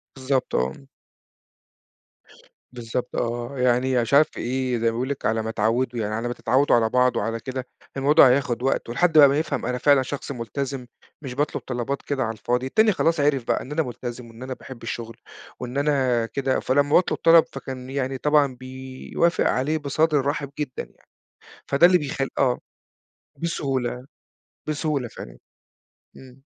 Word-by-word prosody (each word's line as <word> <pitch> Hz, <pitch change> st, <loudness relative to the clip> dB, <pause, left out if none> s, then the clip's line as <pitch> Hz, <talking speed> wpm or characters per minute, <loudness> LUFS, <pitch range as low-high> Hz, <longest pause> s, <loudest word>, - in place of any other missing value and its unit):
بالضبط 130 Hz, -1 st, -1 dB
آه. 65 Hz, -, -2 dB, 1.9 s
بالضبط 120 Hz, 0 st, -5 dB
آه، 120 Hz, +3 st, -3 dB
يعني 125 Hz, +1 st, +2 dB
أنا 125 Hz, -, +3 dB
مش 115 Hz, -, -3 dB
عارف 150 Hz, +2 st, +7 dB
في -, -, -10 dB
إيه، 130 Hz, 0 st, -1 dB
زي 115 Hz, -, -2 dB
ما 115 Hz, -, +4 dB
باقول 125 Hz, +4 st, -3 dB
لِك 140 Hz, -, -4 dB
على 110 Hz, +1 st, +1 dB
ما 110 Hz, 0 st, -3 dB
تعوّده 115 Hz, +3 st, 0 dB
يعني 105 Hz, -1 st, -2 dB
على 115 Hz, +2 st, -2 dB
ما 120 Hz, -, -2 dB
تتعوّدوا 130 Hz, +4 st, +2 dB
على 115 Hz, -2 st, +2 dB
بعض 125 Hz, +1 st, +3 dB
وعلى 115 Hz, +2 st, -1 dB
كده، 130 Hz, +1 st, -5 dB, 0.3 s
الموضوع 140 Hz, 0 st, +6 dB
هياخد 125 Hz, -2 st, +1 dB
وقت 135 Hz, -3 st, 0 dB
ولحد 160 Hz, +6 st, +2 dB
بقى 145 Hz, -2 st, +10 dB
ما 140 Hz, +2 st, +2 dB
يفهَم 150 Hz, -4 st, -2 dB
أنا 125 Hz, -, -1 dB
فعلًا 140 Hz, +1 st, +4 dB
شخص 140 Hz, +2 st, -5 dB
ملتزِم، 130 Hz, +2 st, -4 dB, 0.4 s
مش 135 Hz, -4 st, -6 dB
باطلُب 145 Hz, +3 st, -1 dB
طلبات 125 Hz, +2 st, -3 dB
كده 140 Hz, -2 st, -2 dB
على 110 Hz, -, -1 dB
الفاضي، 125 Hz, +3 st, -1 dB
التاني 215 Hz, +11 st, +3 dB
خلاص 165 Hz, -4 st, +1 dB
عرِف 145 Hz, -3 st, +2 dB
بقى -, -, +1 dB
إن 130 Hz, -, -10 dB
أنا 160 Hz, +2 st, +1 dB
ملتزِم 120 Hz, -1 st, -7 dB
وإن 115 Hz, +2 st, -11 dB
أنا 130 Hz, 0 st, -4 dB
باحب 130 Hz, -2 st, -11 dB
الشغل 115 Hz, 0 st, -6 dB, 0.4 s
وإن 125 Hz, +2 st, -5 dB
أنا 135 Hz, -5 st, +2 dB
كده، 135 Hz, +2 st, -1 dB
فلما 145 Hz, +2 st, +1 dB
باطلُب 180 Hz, -, +3 dB
طلَب 165 Hz, 0 st, +6 dB
فكان 130 Hz, -1 st, -7 dB
يعني 135 Hz, -1 st, -2 dB
طبعًا 145 Hz, -1 st, +2 dB
بيوافق 130 Hz, +6 st, -2 dB
عليه 150 Hz, +5 st, 0 dB
بصدر 155 Hz, +1 st, +1 dB
رحِب 145 Hz, 0 st, -2 dB
جدًا 140 Hz, -4 st, -3 dB
يعني، -, -, -21 dB, 0.6 s
فده 165 Hz, +6 st, +6 dB
اللي 180 Hz, -, +5 dB
بيخل 140 Hz, -3 st, -3 dB
آه. 125 Hz, -2 st, +2 dB, 0.8 s
بسهولة، 130 Hz, -6 st, -2 dB, 0.6 s
بسهولة 150 Hz, -4 st, -1 dB
فعلًا. -, -, -11 dB, 0.8 s
إمم. 130 Hz, 0 st, -15 dB
130 Hz, 170 wpm, -24 LUFS, 120-140 Hz, 1.9 s, بقى